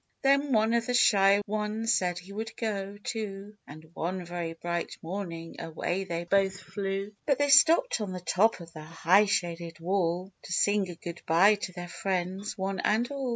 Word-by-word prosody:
Then 275 +1 +3
one 220 -1 +3
of 235 +1 +1
the 245 - 0
shy 200 -3 +5
ones 215 +2 -1
said 180 -1 0
he 180 +3 -10
would 220 +2 -6
go, 200 -3 -3
too, 210 -2 -5
And 155 +2 -12
one 180 +2 -3
very 170 -1 -4
bright 170 +1 -4
morning 165 -2 -6
away 175 +3 -3
they 170 -2 -3
both 190 +1 +1
flew; 195 +1 -4
But 280 - +3
they 285 0 +1
stopped 325 - +5
on 205 -3 -3
the 185 - -5
top 190 +3 +2
of 170 0 -12
the 155 - -9
high 165 +6 +3
shaded 170 -4 -2
wall, 180 +1 -1
To - - -11
sing 205 +1 +2
a 175 - -7
good 170 0 -8
bye 180 +6 +6
to 200 -2 -4
their 175 0 -7
friends, 190 +2 -3
one 195 0 -2
and 235 +5 +1
all. 275 -2 -3
195 Hz, 190 wpm, -28 LUFS, 175-215 Hz, -, bye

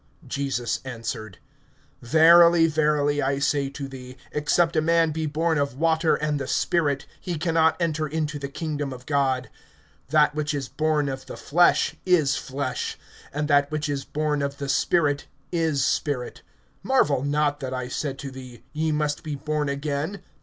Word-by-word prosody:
(5)Jesus 135 -4 -2
answered: 115 -5 -6 0.6
Verily, 165 +5 +6
verily, 150 -2 +1
I 135 +1 0
say 140 0 0
to 140 0 -6
thee, 130 -1 -10
except 165 +3 +1
a 155 - +3
man 165 0 +3
be 160 0 -2
born 160 +1 0
of 140 -3 -2
water 160 +1 +2
and 150 -1 -1
the 135 - -4
Spirit, 145 -5 0
he 175 -4 -4
can 165 +2 -1
not 160 0 +3
enter 155 -2 0
into 150 -1 -2
the 140 - -4
kingdom 145 -1 -4
of 125 0 -11
God. 135 -3 0 0.6
(6)That 150 0 +4
which 150 0 -2
is 135 -3 -3
born 155 -1 0
of 135 -1 -5
the - - -8
flesh 175 +4 +3
is 160 -6 +3
flesh; 135 -2 -3 0.3
and 150 +1 -2
that 145 -1 +3
which 155 0 -2
is 140 -2 -2
born 150 -1 -1
of 140 0 -3
the 140 -1 -5
Spirit 145 -1 +1 0.2
is 160 -5 +1
spirit. 140 -4 -2 0.4
(7)Marvel 150 - +2
not 145 0 +1
that 130 -3 -5
I 130 -1 -3
said 135 +1 -3
to 135 - -5
thee: 130 -2 -11
Ye 155 +1 0
must 150 -1 -1
be 155 -3 -4
born 150 +1 -2
again. 145 +6 -3
145 Hz, 170 wpm, -25 LUFS, 140-155 Hz, 0.6 s, Verily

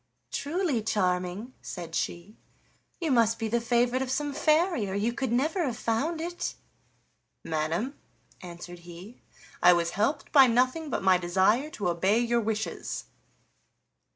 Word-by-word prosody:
"Truly, 305 - -1
Charming," 190 +1 -1
said 170 -3 -7
she, 175 +6 -3 0.6
"you 330 -4 -1
must 230 -2 +3
be 225 - -2
the 235 +2 0
favorite 240 +2 +2
of 265 - -2
some 290 +2 -1
fairy, 310 - +2
or 190 - -3
you 220 +4 0
could 260 -1 -2
never 310 +9 +1
have 250 -7 -2
found 285 +9 -1
it." 345 +2 -4 0.9
"Madam," 165 - -1 0.5
answered 175 0 -9
he, 175 +7 -12 0.4
"I 180 - +8
was 170 -1 0
helped 275 +9 -1
by 270 -3 +8
nothing 255 +6 +1
but 240 - -2
my 185 -1 +5
desire 190 +10 +2
to 210 - -3
obey 185 +5 +2
your 235 0 +2
wishes." 220 0 -3
230 Hz, 145 wpm, -28 LUFS, 185-270 Hz, 0.9 s, I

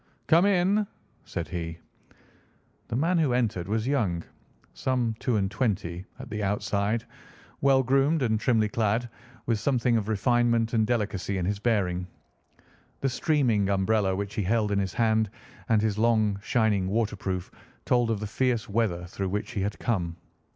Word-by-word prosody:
"Come 170 +4 +5
in!" 200 +2 +2 0.4
said 85 - -4
he. 85 -2 -4 1.1
The - - -3
man 165 +7 +2
who 145 -6 +2
entered 110 -8 0
was 110 +2 -1
young, 105 -12 0 0.5
some 125 -3 0
two 125 - 0
and 95 -2 0
twenty 95 -5 -2
at - - -9
the 105 0 -3
outside, 105 +2 0 0.6
well 135 -1 +4
groomed 135 +4 +2
and 110 -3 +1
trimly 110 -2 +2
clad, 110 +2 0 0.4
with 115 -3 +1
something 125 -3 +2
of 105 -2 -2
refinement 115 +1 +2
and 110 -2 +2
delicacy 100 -4 -1
in 90 - -1
his 100 +2 -1
bearing. 95 -6 0 0.9
The 135 - +1
streaming 125 - +1
umbrella 100 0 +2
which 100 +1 -4
he 110 - -1
held 105 +2 +1
in 100 - +2
his 95 -1 -2
hand, 110 -2 +2 0.4
and 110 -2 +3
his 110 -1 0
long 110 -3 +2
shining 110 -4 +1
waterproof 100 -3 -2 0.3
told 120 -2 +2
of 110 -3 0
the 105 - -4
fierce 120 +1 0
weather 100 -5 0
through 95 +2 -4
which 105 +2 -3
he 100 - -2
had 100 +1 -2
come. 90 -8 -1
110 Hz, 160 wpm, -27 LUFS, 100-120 Hz, 1.1 s, Come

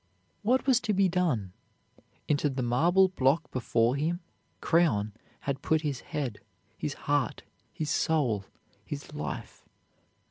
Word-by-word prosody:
What 245 +4 +2
was 260 -3 +5
to 225 -4 0
be 195 0 +4
done? 155 - 0 0.7
Into 145 0 +2
the 130 -2 -2
marble 175 +11 +4
block 145 -1 +1
before 120 -1 +2
him 165 +5 0 0.4
Creon 115 -12 +2 0.3
had 140 0 -2
put 160 +1 +2
his 145 -5 -2
head, 140 -9 -4 0.4
his 145 +3 -3
heart, 145 -1 0 0.3
his 155 -4 -3
soul, 125 -14 +1 0.4
his - - -7
life. - - -6
150 Hz, 130 wpm, -29 LUFS, 125-175 Hz, 0.7 s, was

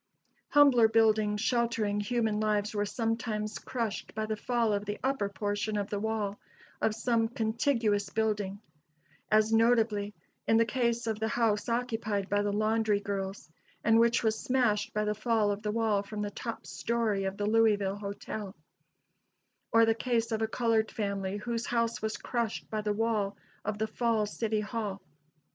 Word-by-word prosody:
Humbler 275 -6 +6
buildings 215 -2 +3
sheltering 230 -3 +1
human 220 0 0
lives 210 0 0
were 205 -1 0
sometimes 225 -1 -2
crushed 230 -6 -4
by 215 0 -1
the 215 0 -2
fall 230 0 0
of 205 0 -1
the 205 0 -3
upper 265 -6 0
portion 205 +2 -2
of 205 -1 -3
the 205 - -1
wall 210 -2 -2 0.4
of 215 - +1
some 225 0 +1
contiguous 225 -3 0
building; 205 -2 -1 0.7
as 215 +1 +3
notably, 225 -3 +2 0.3
in 225 - +5
the 230 - +4
case 235 0 0
of 220 -2 -2
the 220 - 0
house 225 -2 +1
occupied 225 -4 -1
by 205 0 +2
the 205 0 0
laundry 215 0 +1
girls, 195 -3 -4 0.3
and 225 0 +5
which 235 +1 +3
was 220 -1 +1
smashed 240 -5 +1
by 210 0 -1
the 210 - +1
fall 215 -1 +1
of 200 +1 -3
the 210 -1 -2
wall 220 -2 +1
from 210 +1 -5
the 205 - -3
top 230 +3 -6
story 225 -4 -1
of 190 +1 -3
the 205 - -1
Louisville 210 -3 +3
Hotel; 205 0 -6 1.2
or 230 0 +6
the 225 - +3
case 230 0 -1
of 220 0 -1
a 220 - +1
colored 225 -1 +1
family 200 -3 -2
whose 235 +2 -3
house 230 -1 0
was 220 0 -2
crushed 235 -3 -3
by 215 -1 -1
the 210 0 -1
wall 210 -2 0 0.3
of 210 0 -2
the 220 - 0
Falls 220 -1 0
City 220 -2 0
Hall. 210 -3 -3
220 Hz, 170 wpm, -30 LUFS, 205-230 Hz, 1.2 s, Humbler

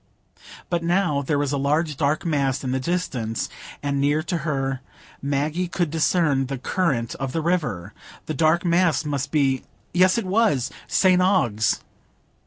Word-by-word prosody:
But 170 -1 +1
now 170 -4 +1
there 145 +1 0
was 145 -1 0
a 140 - 0
large 150 +2 +1
dark 145 +4 0
mass 140 -4 0
in 130 - -2
the 130 - 0
distance, 130 -8 -2 0.3
and 140 -1 0
near 145 +2 +2
to 170 +1 -2
her 135 -4 -2 0.4
Maggie 150 +6 -1
could 175 -3 -1
discern 155 -4 +2
the 135 0 -3
current 130 -5 -1
of 135 -1 -3
the 165 - 0
river. 150 - -1 0.3
The 155 - -3
dark 160 +4 +2
mass 170 -3 +2
must 145 -1 -2
be—yes, 150 - +1
it 230 - -1
was—St 185 - +2
Ogg's. 120 - +2
150 Hz, 150 wpm, -23 LUFS, 135-175 Hz, 0.4 s, near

